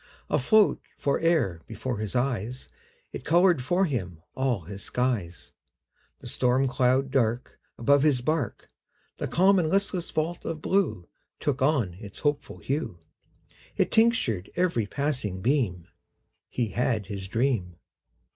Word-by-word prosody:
Afloat 215 +10 +4 0.2
fore'er 140 - +1
before 125 -5 -4
his 110 +2 -4
eyes, 125 -1 -2 0.4
It - - -7
colored 175 -3 +4
for 180 +8 +2
him 95 - -3
all 130 -6 0
his 100 +4 -8
skies: 115 -10 -2 0.7
The - - -9
storm 130 +2 +2
cloud 130 +1 +2
dark 120 -2 0 0.2
Above 140 +4 +4
his 145 -4 +3
bark, 150 -4 -2 0.5
The - - -3
calm 190 +2 +4
and 160 -3 +1
listless 195 -1 0
vault 160 +2 -2
of 165 -1 -4
blue 170 - 0 0.3
Took 140 -2 -1
on 130 - +2
its 105 -2 -10
hopeful 145 -1 -1
hue, 140 - -3 0.8
It - - +2
tinctured 220 - +2
every 170 - +1
passing 130 -8 -2
beam 105 - 0 0.6
He 120 -3 -1
had 115 -1 0
his 95 0 -6
dream. 110 -6 0
130 Hz, 130 wpm, -27 LUFS, 105-155 Hz, 0.8 s, Afloat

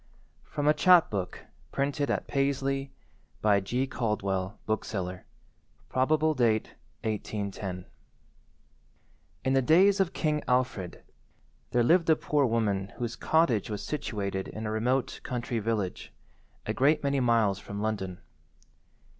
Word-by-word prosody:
[From 145 0 -2
a 150 - +6
Chap–book 155 - +3 0.3
printed 140 +1 -1
at - - 0
Paisley, 135 0 -1 0.5
by 105 -2 +4
G. 120 +7 -1
Caldwell, 100 -6 -2
bookseller. 95 -4 -3 0.6
Probable 155 +4 +2
date, 115 -5 +1 0.3
1810] 100 -4 -4 1.6
In 130 - +2
the 135 - +4
days 190 - +5
of 190 -2 +2
King 150 -4 0
Alfred 125 -8 -1 0.7
there 120 - +2
lived 165 +6 +4
a 160 - +7
poor 145 -3 +1
woman 105 -4 0
whose 120 -2 -3
cottage 160 - +2
was 105 -2 -4
situated 100 -10 -3
in 110 +1 -6
a 105 - -2
remote 125 +4 0
country 120 -1 -3
village, 105 -4 -2 0.5
a 110 - -1
great 145 +6 +3
many 140 -1 +1
miles 115 -5 +2
from 100 0 -7
London. 100 -4 -3
120 Hz, 120 wpm, -29 LUFS, 100-140 Hz, 1.6 s, a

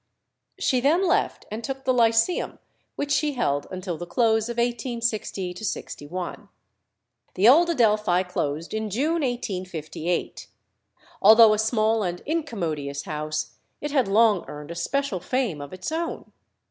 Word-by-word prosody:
She 255 - +1
then 315 +9 +3
left 345 - 0
and 220 +2 -5
took 270 +2 -5
the 260 - +3
Lyceum, 230 +7 +2 0.4
which 285 0 -3
she 295 0 +2
held 145 - -1
until 180 -3 -5
the 175 - -6
close 220 +2 +2
of 235 - -5
1860 220 - -3
1. 180 +2 -6 0.9
The 195 +4 +4
old 330 +7 +7
Adelphi 215 - +3
closed 160 -3 -3
in 220 0 -2
June 305 - 0
1858. 185 - -3 0.7
Although 220 +1 +8
a 210 - 0
small 220 0 +2
and 175 -3 -3
incommodious 170 - -3
house, 155 0 -4 0.2
it 295 - -4
had 270 -6 +2
long 210 -1 +4
earned 150 +1 -8
a - - -6
special 245 +4 -1
fame 205 - -1
of 145 - -8
its 185 +9 -5
own. 330 +1 -4
220 Hz, 140 wpm, -25 LUFS, 180-255 Hz, 0.9 s, Although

